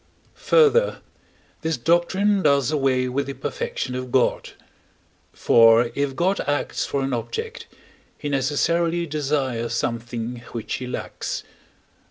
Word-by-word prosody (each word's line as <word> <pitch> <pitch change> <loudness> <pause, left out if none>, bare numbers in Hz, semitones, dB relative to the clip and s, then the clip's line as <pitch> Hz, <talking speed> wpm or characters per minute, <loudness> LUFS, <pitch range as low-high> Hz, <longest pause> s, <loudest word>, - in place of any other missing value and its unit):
Further, 475 +1 +4 0.6
this 160 -2 -1
doctrine 190 - +2
does 140 -4 +3
away 135 -4 +1
with 135 +3 -2
the 140 - -5
perfection 135 -2 -4
of 125 0 -5
God: 130 -1 +1 0.8
for, 115 +1 +5
if 140 0 -1
God 185 +5 +1
acts 145 0 -1
for 140 -1 -1
an 135 -1 -2
object, 450 - -4 0.5
he 150 - -5
necessarily 165 +5 +1
desires 135 -6 -1
something 120 +1 -3 0.2
which 115 -2 -4
he 130 - -6
lacks. 125 - -5
140 Hz, 120 wpm, -23 LUFS, 125-170 Hz, 0.8 s, for